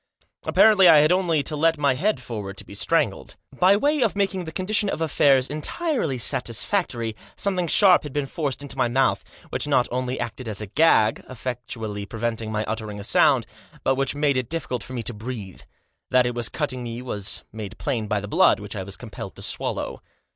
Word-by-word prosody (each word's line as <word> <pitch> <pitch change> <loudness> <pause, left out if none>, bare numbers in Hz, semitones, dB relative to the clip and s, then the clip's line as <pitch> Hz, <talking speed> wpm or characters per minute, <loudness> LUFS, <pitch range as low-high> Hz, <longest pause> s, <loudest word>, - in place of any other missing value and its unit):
Apparently 205 -4 +6
I 155 - +8
had 155 +3 +3
only 175 -5 +2
to 150 - -3
let 165 +2 +2
my 140 -2 +2
head 185 +6 0
forward 105 -6 -6
to - - -8
be - - -12
strangled. - - -1 0.2
By 190 +3 +6
way 295 +5 +1
of 225 -5 +2
making 195 -3 -1
the 160 - -6
condition 200 +4 0
of - - -3
affairs 140 -4 +3
entirely 155 - -1
satisfactory 120 - 0 0.2
something 185 -3 0
sharp 185 +2 +6
had 150 - -8
been 145 0 -1
forced 140 -1 -3
into 140 - -8
my 130 -2 +2
mouth, 130 +2 +1 0.3
which - - -1
not 130 -4 +3
only 125 +1 -2
acted 120 0 -5
as 105 - -3
a 105 - -4
gag, 110 -2 +3
effectually 115 -4 -5
preventing 115 0 -3
my 110 0 -1
uttering 110 -1 -5
a - - -7
sound, 130 +2 +4 0.4
but 135 - +3
which 135 +1 -1
made 145 -2 +1
it 130 -2 -2
difficult 135 -7 -3
for 130 - -9
me 120 -2 -3
to 120 - -2
breathe. 110 -4 -7 0.5
That 125 -1 +4
it 120 - -1
was 120 -1 -1
cutting 140 -5 -3
me 120 0 -6
was 105 -5 -4
made 110 -3 -7
plain 110 -4 -2
by 105 -1 0
the 105 - -6
blood 100 - +4
which 105 -1 -8
I 100 - -3
was 95 +1 -7
compelled - - -8
to - - -9
swallow. - - -3
130 Hz, 205 wpm, -24 LUFS, 115-160 Hz, 0.5 s, I